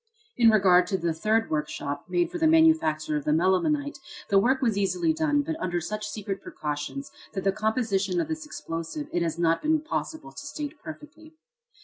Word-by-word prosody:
In 235 -2 +6
regard 185 -4 +5
to 190 - 0
the 170 -2 -1
third 220 +6 +1
workshop, 145 -2 -3
made 175 -1 +1
for 350 - -4
the 320 - +4
manufacture 315 - +3
of 150 - -4
the - - -2
melimelonite, 275 - +1 0.3
the 195 - +5
work 260 +6 +2
was 230 -5 +1
easily 320 - +1
done, 305 -2 +1
but 320 +2 -3
under 175 -1 -1
such 210 +5 -4
secret 195 -2 -4
precautions, 150 - -5 0.2
that 195 - -3
the 195 - +3
composition 205 -3 0
of - - 0
this 315 -1 -4
explosive 290 - -5
it 175 - +1
has 165 -1 -1
not 165 -1 +2
been 310 0 +2
possible 315 0 -4
to - - -9
state 290 0 -5
perfectly. 315 0 -11
215 Hz, 190 wpm, -26 LUFS, -, 0.3 s, In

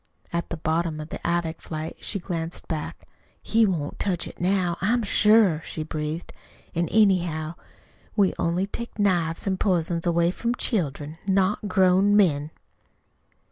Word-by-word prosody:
At 170 0 -2
the 170 - -4
bottom 160 0 -1
of 155 +1 -7
the - - -5
attic 170 -1 -1
flight 155 0 -6
she 205 - -2
glanced 170 -3 -5
back. 155 -2 -5 0.3
"He 225 0 +3
won't 155 -6 -3
touch 180 -4 -1
it - - -11
now, 180 -1 +1
I'm 230 +4 +2
sure," 210 -5 +4
she 155 - -5
breathed. 155 +1 -4 0.4
"An', 170 0 0
anyhow, 175 -7 +2 0.6
we 200 -3 +3
only 175 +3 +1
take 235 +3 -7
knives 175 -5 +1
an' 190 -2 0
pizen 175 -3 +1
away 170 0 +2
from 235 +5 -2
children 155 - -2
not 195 +2 +1
grown 190 +1 +4
men!" 155 -8 +3
175 Hz, 145 wpm, -25 LUFS, 160-195 Hz, 0.6 s, sure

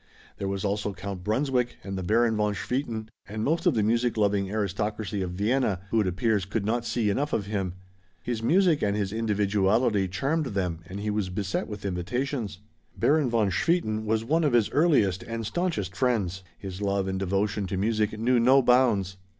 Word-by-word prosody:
There 100 - -2
was 100 +1 -2
also 100 0 -1
Count 95 -1 -6
Brunswick 125 +3 0
and 95 0 -5
the 95 - -3
Baron 110 +4 +2
von 105 -1 0
Swieten, 115 -1 -3 0.2
and 110 +1 -4
most 160 +6 +1
of - - +3
the 110 - +2
music 115 +2 +1
loving 100 -2 +1
aristocracy 105 0 -2
of 90 - -2
Vienna, 105 0 +1
who 110 - +3
it 100 - 0
appears 100 +3 +1
could 100 +2 -2
not 120 +2 0
see 110 -4 +1
enough 145 +8 -1
of 100 - 0
him. 95 -4 -2 0.5
His 120 -2 -2
music 170 +4 +3
and 100 0 +1
his 100 -1 -2
individuality 105 -1 +2
charmed 140 - -1
them 90 -4 -1
and 95 +3 -6
he 105 0 -1
was 105 -3 -1
beset 100 +1 -2
with 105 -2 -7
invitations. 100 +4 -2 0.4
Baron 150 -3 +3
von 110 -4 +2
Swieten 110 - +1
was 110 +1 +1
one 160 +6 +2
of 145 -5 +2
his 115 -3 +3
earliest 125 - +3
and 115 -1 -5
staunchest 105 - -2
friends. 100 -8 0 0.2
His 95 0 -7
love 100 -1 0
and 95 0 -2
devotion 100 +1 0
to 95 - -3
music 110 +1 0
knew 120 +3 +2
no 130 +3 +5
bounds. 115 -7 +3
105 Hz, 190 wpm, -27 LUFS, 100-120 Hz, 0.5 s, no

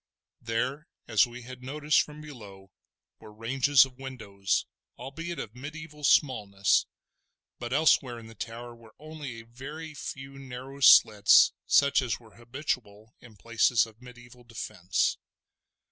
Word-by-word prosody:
There, 125 +6 -2 0.2
as 115 0 +4
we 120 +1 -10
had 130 +1 -10
noticed 150 +3 +1
from 150 0 -9
below, 100 -10 -12 0.5
were 105 - -13
ranges 130 +5 +3
of 130 -1 -16
windows, 100 -8 -2 0.3
albeit 165 +7 -6
of 110 -5 -6
mediaeval 150 +3 -8
smallness, 100 - +2 0.7
but 120 0 -6
elsewhere 135 -4 +3
in 115 - -11
the 115 - -12
tower 115 +2 -7
were 115 -2 -18
only 150 -6 -8
a - - -18
very 145 +7 -9
few 135 -1 -8
narrow 135 +1 -9
slits 105 -6 +7
such 140 -1 +4
as 125 -3 -2
were 115 -3 -19
habitual 120 -3 -5
in 115 -3 -16
places 115 +1 +2
of 110 +1 -17
mediaeval 120 0 -15
defence. 95 -5 -2
125 Hz, 135 wpm, -28 LUFS, 115-140 Hz, 0.7 s, slits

